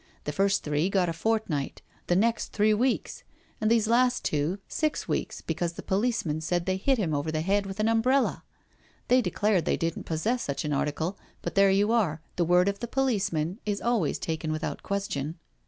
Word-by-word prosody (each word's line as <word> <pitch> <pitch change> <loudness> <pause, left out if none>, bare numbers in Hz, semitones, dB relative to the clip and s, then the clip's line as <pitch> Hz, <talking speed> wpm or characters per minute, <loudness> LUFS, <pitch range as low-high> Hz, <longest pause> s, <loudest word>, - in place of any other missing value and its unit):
The 150 - -3
first 195 +5 +1
three 150 +4 0
got 185 -3 +2
a - - -1
fortnight, 165 -6 -1 0.2
the 175 - +3
next 225 +5 +1
three 215 0 +3
weeks, 245 +4 0 0.4
and 215 - +2
these 225 -2 +3
last 245 +2 +3
two, 150 +5 0
six 310 -1 -1
weeks, - - -2
because 175 -1 -2
the - - -8
policeman 190 -7 0
said 175 +2 -1
they 185 0 0
hit 265 +7 +2
him 175 -8 0
over 145 +2 -1
the 155 0 -1
head 200 +3 +1
with 195 +1 -7
an 215 - +2
umbrella. 250 +4 +2 0.7
They 255 +1 +5
declared 200 -2 +1
they - - +1
didn't 165 0 -2
possess 215 +10 0
such 140 +2 -3
an 150 - -1
article— 160 +6 -1 0.2
but - - -3
there 195 0 +5
you 200 +3 +3
are, 190 -10 +1 0.2
the 175 - +1
word 180 +2 +4
of 200 0 -1
the 235 - -4
policeman 205 - 0
is 205 -1 -1
always 230 -10 +1
taken 160 -1 -3
without 155 +1 -3
question. 170 -6 -3
195 Hz, 195 wpm, -27 LUFS, 160-225 Hz, 0.7 s, They